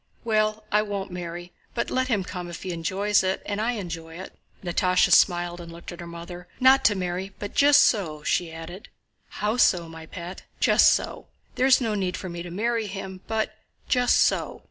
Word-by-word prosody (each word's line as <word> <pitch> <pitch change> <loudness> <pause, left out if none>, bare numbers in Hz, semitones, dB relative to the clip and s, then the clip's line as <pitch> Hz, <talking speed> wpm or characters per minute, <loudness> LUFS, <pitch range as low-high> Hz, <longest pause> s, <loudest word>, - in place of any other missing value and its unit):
"Well, 215 -1 +1
I 210 - +4
won't 200 -2 -4
marry, 175 0 -7 0.2
but 235 - -2
let 260 0 +1
him 215 -7 +1
come 180 -1 -6
if 170 - -8
he 185 - -4
enjoys 190 +5 +1
it 190 0 -1
and 205 +1 -2
I 240 +3 0
enjoy 165 -6 -6
it." 185 - -9 0.3
Natásha 180 +1 +2
smiled 175 -1 +3
and 170 -1 -10
looked 170 +2 -9
at 175 - -10
her 170 - -7
mother. 175 +1 -9
"Not 260 +1 +6
to 205 - +5
marry, 185 +1 -3
but 205 - -6
just 285 0 +6
so," 155 -9 0
she 175 -2 0
added. 165 +4 -9 0.4
"How 210 +3 -2
so, 175 -8 +3
my 160 -1 -10
pet?" 175 +2 -8 0.2
"Just - - +6
so. - - -2 0.3
There's 260 +1 +4
no 225 -4 -1
need 185 -3 -1
for 185 - -6
me 170 0 -6
to 175 - -7
marry 225 +4 -1
him. 190 -1 -7
But... 220 -1 -1 0.3
just 250 -1 +3
so." - - +1
185 Hz, 195 wpm, -25 LUFS, 175-215 Hz, 0.4 s, Not